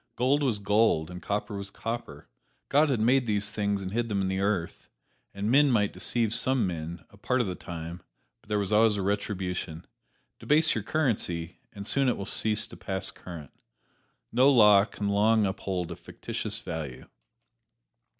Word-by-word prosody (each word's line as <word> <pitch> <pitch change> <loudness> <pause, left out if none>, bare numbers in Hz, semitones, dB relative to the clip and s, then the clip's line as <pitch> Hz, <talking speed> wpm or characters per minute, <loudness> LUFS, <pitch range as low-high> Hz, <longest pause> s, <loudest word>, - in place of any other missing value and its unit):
Gold 135 +4 +2
was 125 -7 +1
gold, 105 -5 +2
and 90 0 -8
copper 105 +1 -3
was 100 0 -5
copper 115 -9 -6 0.4
God 150 +2 +4
had 130 -5 +1
made 125 +3 +3
these 105 0 +1
things 100 -2 -1
and 95 - -5
hid 115 +2 -1
them 100 -2 0
in 95 -1 0
the 95 0 -1
earth 100 -4 -2 0.4
and 100 +2 -2
men 145 +2 +5
might 105 -5 +2
deceive 115 -3 0
some 125 0 +1
men 85 -1 -5
a 100 - -17
part 125 +5 0
of 120 - +2
the 95 - -3
time 85 0 -7 0.4
but - - -25
there 105 - +1
was 100 0 -1
always 105 0 +4
a 100 - -2
retribution. 90 -4 -3 0.5
Debase 155 +2 +3
your 110 - -3
currency, 100 - -1
and 100 -1 -8
soon 135 +3 +2
it - - 0
will 100 - -5
cease 105 0 +1
to - - -12
pass 95 0 -3
current. 80 -6 -10 0.8
No 130 +4 +5
law 105 -6 +7
can 105 -2 -5
long 105 +2 +3
uphold 95 -3 -3
a - - -5
fictitious - - -6
value. 75 -6 -6
105 Hz, 180 wpm, -28 LUFS, 95-115 Hz, 0.8 s, law